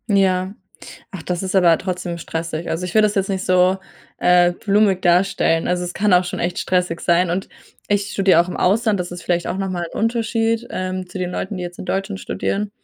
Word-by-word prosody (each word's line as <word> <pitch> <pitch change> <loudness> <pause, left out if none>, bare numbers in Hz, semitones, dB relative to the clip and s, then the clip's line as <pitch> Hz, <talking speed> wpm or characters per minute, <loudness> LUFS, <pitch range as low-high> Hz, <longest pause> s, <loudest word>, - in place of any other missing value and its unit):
Ja. 190 0 +1 0.5
Ach, 180 -5 -8
das 180 -1 -2
ist 190 0 -3
aber 175 -3 +5
trotzdem 180 -2 -4
stressig. 165 0 -4
Also, 180 +3 -2
ich 180 - -6
will 215 - +5
das 210 -1 +2
jetzt 195 0 0
nicht 190 -1 -2
so, 185 +1 +3 0.4
äh, 180 0 +4
blumig 200 0 +1
darstellen. 175 -2 +2
Also, 180 0 0
es 175 0 -5
kann 205 -1 +2
auch 180 0 +4
schon 180 - -5
echt 175 +1 -2
stressig 180 -2 0
sein. 175 +1 +2
Und 185 +2 -3 0.4
ich 205 0 0
studiere 190 -4 +4
auch 175 - -5
im - - -5
Ausland, 210 +1 +2
das 175 0 -4
ist 175 -1 -8
vielleicht 175 -1 0
auch - - -3
nochmal 185 -3 -2
'n - - -7
Unterschied, 230 0 0
ähm, 185 0 -4
zu 185 - -7
den 180 -1 -3
Leuten, 190 +2 -4
die 180 - -4
jetzt 175 0 -8
in - - -6
Deutschland 195 +2 -2
studieren. 205 +1 -3
185 Hz, 220 wpm, -20 LUFS, 175-195 Hz, 0.5 s, aber